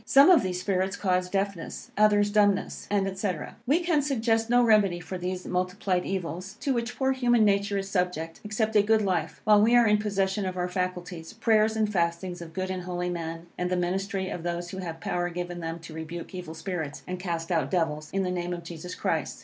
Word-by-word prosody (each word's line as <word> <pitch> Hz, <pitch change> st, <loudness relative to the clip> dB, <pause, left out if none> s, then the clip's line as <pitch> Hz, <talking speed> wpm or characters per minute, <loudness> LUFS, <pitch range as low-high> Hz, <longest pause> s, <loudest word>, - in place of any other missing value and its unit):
Some 280 Hz, +6 st, +7 dB
of 355 Hz, -, +7 dB
these 180 Hz, -2 st, -2 dB
spirits 190 Hz, +1 st, 0 dB
cause 180 Hz, -2 st, 0 dB
deafness, 195 Hz, -3 st, -3 dB
others 205 Hz, 0 st, +4 dB
dumbness, 205 Hz, -2 st, +2 dB
&c. 195 Hz, 0 st, 0 dB, 0.4 s
We 305 Hz, +7 st, +3 dB
can 340 Hz, -4 st, +2 dB
suggest 225 Hz, -5 st, +1 dB
no 245 Hz, 0 st, +5 dB
remedy 210 Hz, -6 st, +4 dB
for 185 Hz, +1 st, -6 dB
these 180 Hz, +1 st, -4 dB
multiplied 180 Hz, 0 st, -1 dB
evils, 190 Hz, +1 st, -4 dB
to 275 Hz, -, +1 dB
which 235 Hz, 0 st, -3 dB
poor 265 Hz, 0 st, +2 dB
human 240 Hz, -4 st, +3 dB
nature 200 Hz, 0 st, +2 dB
is 195 Hz, 0 st, -2 dB
subject, 180 Hz, -4 st, -2 dB
except 220 Hz, +1 st, -1 dB
a 210 Hz, -, +7 dB
good 215 Hz, +1 st, +3 dB
life, 180 Hz, -5 st, -1 dB
while 210 Hz, -1 st, +6 dB
we 230 Hz, +3 st, +5 dB
are 240 Hz, -1 st, +6 dB
in 210 Hz, -1 st, +4 dB
possession 195 Hz, -1 st, 0 dB
of 185 Hz, 0 st, -4 dB
our 180 Hz, 0 st, 0 dB
faculties, 180 Hz, -1 st, -4 dB
prayers 220 Hz, -1 st, +3 dB
and 215 Hz, -1 st, 0 dB
fastings 175 Hz, 0 st, -1 dB
of 165 Hz, -1 st, -8 dB
good 185 Hz, 0 st, -2 dB
and 185 Hz, -1 st, -3 dB
holy 180 Hz, 0 st, -2 dB
men, 165 Hz, -1 st, -5 dB
and 180 Hz, 0 st, 0 dB
the 180 Hz, -, 0 dB
ministry 190 Hz, +2 st, -1 dB
of 175 Hz, -, -4 dB
those 175 Hz, +1 st, -3 dB
who 190 Hz, -, -6 dB
have 165 Hz, -3 st, -5 dB
power 175 Hz, 0 st, -1 dB
given 175 Hz, 0 st, -5 dB
them 165 Hz, 0 st, -4 dB
to 165 Hz, -, -10 dB
rebuke 160 Hz, +3 st, -7 dB
evil 175 Hz, -3 st, -6 dB
spirits, 160 Hz, -3 st, -4 dB
and 180 Hz, 0 st, -4 dB
cast 170 Hz, -2 st, -3 dB
out 165 Hz, -2 st, +1 dB
devils, 155 Hz, -4 st, -1 dB
in 195 Hz, 0 st, 0 dB
the 180 Hz, -, -1 dB
name 175 Hz, 0 st, -2 dB
of 170 Hz, -1 st, -6 dB
Jesus 170 Hz, +1 st, -7 dB
Christ. -, -, -1 dB
185 Hz, 215 wpm, -27 LUFS, 175-210 Hz, 0.4 s, Some